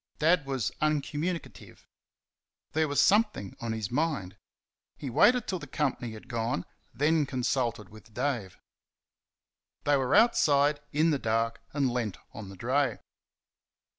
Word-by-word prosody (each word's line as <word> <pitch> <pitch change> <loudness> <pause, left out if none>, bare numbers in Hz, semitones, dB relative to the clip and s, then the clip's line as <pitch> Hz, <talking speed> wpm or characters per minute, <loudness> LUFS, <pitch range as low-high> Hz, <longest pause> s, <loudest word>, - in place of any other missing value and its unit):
Dad 160 -2 +3
was 130 -6 -1
uncommunicative. 150 - -3 0.8
There 155 0 +1
was 145 -1 0
something 205 - +2
on 115 -1 -3
his 110 -2 -3
mind. 130 - -1 0.6
He 135 - -5
waited 235 - +4
till 185 - -3
the 145 - -9
company 130 -5 -2
had 110 +3 -11
gone, 115 -6 -2 0.3
then 150 +4 +2
consulted 120 -5 -1
with 110 +1 -15
Dave. 120 -5 -2 1.3
They 145 -1 +3
were 130 -2 +1
outside, 150 -10 +4
in 155 +3 +3
the 145 - 0
dark, 115 0 0
and 140 -2 +1
leant 115 -6 -2 0.2
on 105 -3 -8
the 95 - -11
dray. 130 +6 +1
135 Hz, 135 wpm, -29 LUFS, 115-150 Hz, 1.3 s, waited